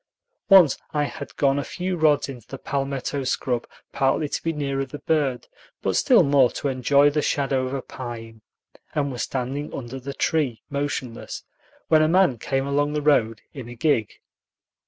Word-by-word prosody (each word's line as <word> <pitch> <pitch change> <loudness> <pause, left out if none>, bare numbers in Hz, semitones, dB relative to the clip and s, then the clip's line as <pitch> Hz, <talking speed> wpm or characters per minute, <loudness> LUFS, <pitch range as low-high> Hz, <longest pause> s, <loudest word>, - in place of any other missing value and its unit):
Once 185 -8 +7 0.2
I 150 - +2
had 145 - -6
gone 140 0 +2
a - - -2
few 180 +4 -3
rods 155 -3 +3
into 125 -5 -9
the 135 - -7
palmetto 140 0 -3
scrub, 125 -2 -1 0.2
partly 135 +3 +1
to - - -3
be 165 - -1
nearer 140 -3 -2
the 135 +2 -7
bird, 145 -6 0 0.4
but - - 0
still 245 -9 +5
more 140 -4 +4
to 140 - -2
enjoy 140 +3 +3
the 150 +1 0
shadow 135 -3 0
of 130 - -4
a 135 - -4
pine, 115 -3 -8 0.5
and 145 -2 0
was 125 - -4
standing 135 +3 -3
under 130 0 -6
the 135 +1 -7
tree, 135 -9 0
motionless, 140 -4 -4 0.4
when 155 -1 +5
a 155 - +4
man 175 -7 +3
came 135 +3 -1
along 145 +1 0
the 150 - -1
road 115 -7 +2
in 130 -5 -8
a 120 - -9
gig. 120 -4 +1
140 Hz, 180 wpm, -24 LUFS, 130-145 Hz, 0.5 s, Once